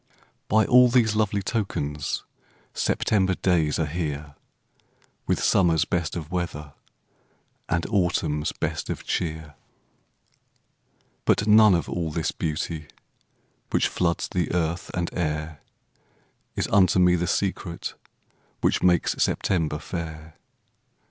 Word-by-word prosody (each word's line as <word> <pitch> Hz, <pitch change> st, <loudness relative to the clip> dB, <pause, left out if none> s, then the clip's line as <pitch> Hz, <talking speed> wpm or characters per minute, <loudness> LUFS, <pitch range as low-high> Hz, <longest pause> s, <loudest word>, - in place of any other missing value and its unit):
By 110 Hz, +1 st, +3 dB
all 125 Hz, 0 st, +7 dB
these 115 Hz, -3 st, +3 dB
lovely 105 Hz, -2 st, 0 dB
tokens 75 Hz, -, -2 dB, 0.5 s
September 95 Hz, -3 st, +1 dB
days 80 Hz, -6 st, +1 dB
are 80 Hz, -, +1 dB
here, 75 Hz, -2 st, -4 dB, 0.9 s
With -, -, 0 dB
summer's 85 Hz, -4 st, +3 dB
best 85 Hz, -2 st, -2 dB
of 80 Hz, -2 st, -6 dB
weather, 80 Hz, -5 st, -4 dB, 1.0 s
And 85 Hz, 0 st, 0 dB
autumn's 85 Hz, -7 st, 0 dB
best -, -, -4 dB
of -, -, -4 dB
cheer. 80 Hz, -3 st, -3 dB, 1.7 s
But 100 Hz, -, +2 dB
none 105 Hz, -2 st, +7 dB
of 85 Hz, -, -1 dB
all 85 Hz, -2 st, -2 dB
this 80 Hz, +1 st, -1 dB
beauty 75 Hz, 0 st, -3 dB, 0.8 s
Which -, -, +2 dB
floods 85 Hz, -2 st, -1 dB
the 90 Hz, -4 st, -1 dB
earth 85 Hz, 0 st, -1 dB
and 85 Hz, -1 st, -2 dB
air 75 Hz, -2 st, -3 dB, 1.0 s
Is -, -, -1 dB
unto 95 Hz, -2 st, +4 dB
me 90 Hz, -1 st, +5 dB
the 90 Hz, 0 st, -1 dB
secret 90 Hz, -3 st, -2 dB, 0.7 s
Which -, -, +2 dB
makes 90 Hz, -2 st, +3 dB
September 80 Hz, -5 st, 0 dB
fair. 80 Hz, 0 st, -7 dB
85 Hz, 115 wpm, -25 LUFS, 80-95 Hz, 1.7 s, all